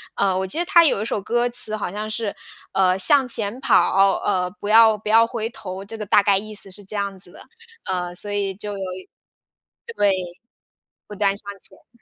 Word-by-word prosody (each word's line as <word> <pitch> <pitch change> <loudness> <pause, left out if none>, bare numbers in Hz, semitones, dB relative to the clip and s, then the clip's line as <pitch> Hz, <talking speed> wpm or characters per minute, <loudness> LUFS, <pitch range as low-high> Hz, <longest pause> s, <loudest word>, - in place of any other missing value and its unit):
呃， 195 -2 +1
我 190 0 -2
记 190 - 0
得 345 - 0
它 340 -1 +5
有 270 - +2
一 - - -3
首 215 - -3
歌 240 +4 0
词 235 -3 +1
好 205 -4 -4
像 210 +2 -5
是 215 -1 -4 0.4
呃： 185 -1 +2
“向 265 +7 +4
前 230 -1 -1
跑， 245 -6 +2 0.4
哦， - - -5
呃， 180 -1 0
不 205 - -4
要 220 0 +6
不 210 0 -7
要 225 +1 +5
回 230 -2 -4
头，” 190 -4 -8
这 225 +3 -9
个 210 - -5
大 200 +1 +4
概 200 -1 +3
意 215 +2 -7
思 200 -1 +5
是 205 +2 -7
这 195 +2 -8
样 200 -1 -3
子 180 - -3
的。 - - -13 0.4
呃， 180 -1 -3
所 205 +3 -4
以 200 -1 -2
就 205 +1 -5
有 195 -1 -5 1.1
对， 200 -1 +3 1.0
不 210 - -9
断 200 -1 +1
向 - - -7 0.2
前。 235 -1 -13
205 Hz, 230 characters per minute, -21 LUFS, 195-225 Hz, 1.1 s, 要